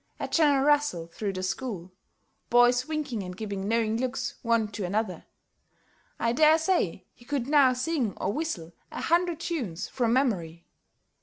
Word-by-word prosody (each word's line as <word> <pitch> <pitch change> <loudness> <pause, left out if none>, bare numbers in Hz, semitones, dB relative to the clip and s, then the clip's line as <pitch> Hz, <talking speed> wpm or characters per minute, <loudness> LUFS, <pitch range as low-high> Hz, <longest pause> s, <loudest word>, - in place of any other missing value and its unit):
[A - - -3
general 285 -4 +3
rustle 290 - +2
through 195 +4 -4
the 185 0 -4
school, 190 -2 -4 0.6
boys 245 +1 +4
winking 295 -8 -3
and 180 -1 -7
giving 200 -2 -4
knowing 225 0 +1
looks 255 +1 -2
one 230 -2 +2
to 205 -1 -5
another.] 210 +5 -2 0.9
I 230 0 0
dare 310 +4 +6
say 320 - 0
he - - -19
could 275 -1 -2
now 280 -3 +5
sing 255 - -1
or 195 - -1
whistle 195 - -4 0.2
a - - -5
hundred 340 -1 +1
tunes 230 - -3
from 240 -3 0
memory. 175 -11 0
240 Hz, 155 wpm, -27 LUFS, 200-290 Hz, 0.9 s, dare